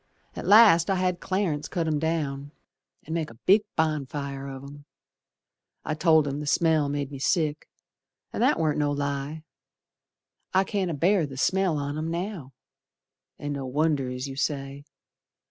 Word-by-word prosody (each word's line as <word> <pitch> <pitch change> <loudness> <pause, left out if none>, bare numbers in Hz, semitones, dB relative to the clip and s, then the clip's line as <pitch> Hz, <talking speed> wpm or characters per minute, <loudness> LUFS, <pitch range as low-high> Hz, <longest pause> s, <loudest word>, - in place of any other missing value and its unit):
At - - -6
last 205 -6 +7
I 195 - +2
had 180 -1 0
Clarence 185 -6 -1
cut 170 -3 -2
'em 155 -2 0
down 145 -3 -2 0.5
An' 160 - -6
make 165 -2 -2
a 115 - -13
big 195 - +4
bonfire 140 -3 -2
of 135 -1 -8
'em. 145 +1 -11 1.0
I - - -1
told 160 -1 +4
him 140 +1 -3
the 150 - -5
smell 155 -2 +2
made 145 -1 -3
me 140 - -7
sick, 155 0 0 0.6
An' - - -3
that - - +4
warn't 155 -2 0
no 145 -1 +1
lie, 145 +2 -3 1.1
I 190 - +5
can't 195 -2 -2
abear 170 +2 +2
the 135 -2 -9
smell 185 +2 +1
on 145 +1 -3
'em 160 +1 -3
now; 170 -5 -4 0.9
An' 145 0 -4
no 135 -2 -4
wonder, 145 -1 0
es 125 +1 -4
you 135 -1 -6
say. 140 0 -3
150 Hz, 165 wpm, -26 LUFS, 140-165 Hz, 1.1 s, last